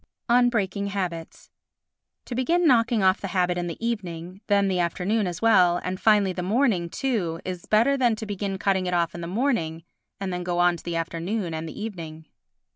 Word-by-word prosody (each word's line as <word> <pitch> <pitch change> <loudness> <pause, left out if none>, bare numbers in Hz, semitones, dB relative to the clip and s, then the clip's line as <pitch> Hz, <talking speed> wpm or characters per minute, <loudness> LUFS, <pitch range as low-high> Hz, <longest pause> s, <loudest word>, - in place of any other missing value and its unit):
On 245 0 +5
Breaking 200 -3 -1
Habits 180 -5 -5 0.7
To - - -6
begin 335 +8 +1
knocking 230 -6 +3
off 185 0 +3
the 195 - -3
habit 180 -1 +2
in 175 0 -2
the 170 - -5
evening, 185 -5 -4
then 200 -1 +3
the 185 -2 0
afternoon 185 +4 0
as 175 +3 -5
well 180 -6 +5
and, 185 +1 -3
finally, 205 -4 +4
the 180 - -4
morning 195 -3 +1
too 185 -9 -2
is 180 -2 -6
better 230 +6 +4
than 240 -4 +2
to 220 - -6
begin 200 -1 -3
cutting 190 -1 0
it 180 - 0
off 170 -1 +1
in 175 - -7
the 170 - -5
morning 180 - -1 0.4
and 195 -2 -3
then 180 - -3
go 175 0 -2
on 175 0 +4
to - - -14
the 170 -1 -4
afternoon 170 +3 -2
and 160 0 -4
evening. 165 -6 -7
185 Hz, 200 wpm, -25 LUFS, 175-220 Hz, 0.7 s, On